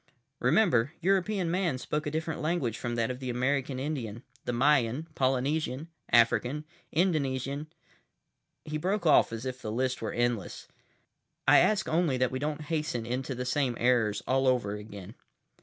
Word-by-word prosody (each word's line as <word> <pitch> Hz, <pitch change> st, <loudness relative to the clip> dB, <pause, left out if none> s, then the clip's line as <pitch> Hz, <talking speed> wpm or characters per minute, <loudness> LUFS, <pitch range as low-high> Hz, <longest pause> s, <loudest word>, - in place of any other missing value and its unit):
Remember, 145 Hz, -, +3 dB
European 190 Hz, -1 st, +1 dB
man 175 Hz, -6 st, 0 dB
spoke 150 Hz, +3 st, -3 dB
a -, -, +1 dB
different 160 Hz, +1 st, -3 dB
language 155 Hz, -8 st, 0 dB
from 120 Hz, -1 st, -3 dB
that 115 Hz, +1 st, 0 dB
of 125 Hz, -, -6 dB
the 130 Hz, -1 st, -4 dB
American 130 Hz, +2 st, 0 dB
Indian, 130 Hz, -6 st, -4 dB, 0.2 s
the -, -, -1 dB
Mayan, 135 Hz, +2 st, +2 dB
Polynesian, 135 Hz, +3 st, 0 dB, 0.2 s
African, 125 Hz, +5 st, +3 dB, 0.3 s
Indonesian—" 145 Hz, -4 st, 0 dB, 1.0 s
He 155 Hz, 0 st, -3 dB
broke 190 Hz, +3 st, -1 dB
off 155 Hz, -, +5 dB
as 115 Hz, +2 st, -5 dB
if 130 Hz, 0 st, -5 dB
the 110 Hz, -, -4 dB
list 130 Hz, +3 st, -1 dB
were 110 Hz, -, -2 dB
endless. 120 Hz, -4 st, -2 dB, 0.8 s
"I -, -, +8 dB
ask 215 Hz, -2 st, +2 dB
only 160 Hz, -5 st, +1 dB
that 125 Hz, -1 st, +1 dB
we 130 Hz, -, -3 dB
don't 150 Hz, +2 st, -2 dB
hasten 150 Hz, -6 st, -2 dB
into 130 Hz, +2 st, -3 dB
the 125 Hz, +1 st, -4 dB
same 125 Hz, -2 st, 0 dB
errors 115 Hz, -5 st, +2 dB
all 130 Hz, +1 st, +2 dB
over 120 Hz, -6 st, +2 dB
again." 105 Hz, -1 st, -9 dB
130 Hz, 155 wpm, -29 LUFS, 120-155 Hz, 1.0 s, I